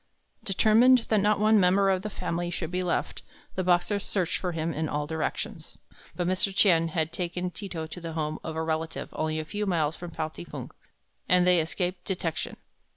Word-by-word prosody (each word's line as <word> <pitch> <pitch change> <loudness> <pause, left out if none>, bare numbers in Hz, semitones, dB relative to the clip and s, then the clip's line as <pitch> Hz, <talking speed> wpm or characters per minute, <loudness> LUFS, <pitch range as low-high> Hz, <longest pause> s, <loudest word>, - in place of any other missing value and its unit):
Determined 225 +5 +5
that 215 - +4
not 210 +1 +3
one 215 0 +5
member 195 +1 +4
of 185 -1 +1
the 210 - -4
family 175 -3 -3
should 170 -1 -4
be 180 0 0
left, 180 -1 -1 0.3
the 185 - -1
Boxers 180 +3 +2
searched 185 -5 -1
for 180 - -2
him 165 0 -2
in 155 0 -2
all 150 0 -1
directions. 160 +3 -4 0.4
But 175 - -1
Mr. 185 +2 +1
Tien 165 -6 +5
had 160 -1 -1
taken 180 0 -3
Ti 200 +2 -7
to 160 -3 -4
to 175 +3 -9
the 165 -1 -5
home 155 -1 -2
of 160 -1 -5
a 160 - -1
relative 160 0 -2
only 155 0 -1
a 155 - -3
few 205 +5 -3
miles 165 -4 +1
from 175 - -7
Pao 155 -1 -3
ting 85 - -10
fu, - - -7 0.6
and 180 0 +5
they 180 -1 +5
escaped 180 +3 -2
detection. 175 -4 -3
175 Hz, 205 wpm, -27 LUFS, 160-195 Hz, 0.6 s, Determined